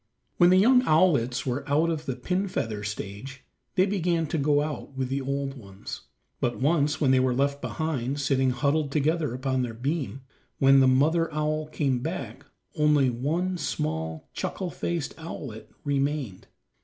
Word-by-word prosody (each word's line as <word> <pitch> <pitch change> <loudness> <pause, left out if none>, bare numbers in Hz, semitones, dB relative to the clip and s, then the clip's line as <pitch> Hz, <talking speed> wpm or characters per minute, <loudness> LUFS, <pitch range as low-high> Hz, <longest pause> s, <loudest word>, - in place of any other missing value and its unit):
When 175 - +6
the 185 - +6
young 250 +6 +6
owlets 140 -7 +3
were 130 +1 -2
out 155 +4 +3
of 155 -2 -4
the 130 - -1
pin 180 +10 -1
feather 110 - -3
stage 105 +6 -6 0.3
they 185 0 +4
began 175 -4 0
to 160 - -1
go 145 +1 +3
out 145 -2 -6
with 130 -1 -1
the 135 +1 -1
old 140 0 -2
ones. 100 -6 -9 0.3
But 120 - -1
once 150 +1 +2
when 140 -4 +3
they 130 - +5
were 130 -1 +2
left 140 +1 0
behind, 145 -4 -2
sitting 135 -2 +2
huddled 140 +3 0
together 155 0 +1
upon 130 0 -1
their 120 -2 -3
beam, 135 +1 -3 0.4
when 135 0 +6
the 130 - +5
mother 160 +6 +3
owl 155 0 -1
came 140 -4 0
back - - -5 0.3
only 150 -4 +3
one 170 +9 -1
small, 80 - -3
chuckle 180 -2 -3
faced 170 -5 -3
owlet 115 -9 -7
remained. 140 -7 -2
140 Hz, 165 wpm, -26 LUFS, 130-155 Hz, 0.4 s, When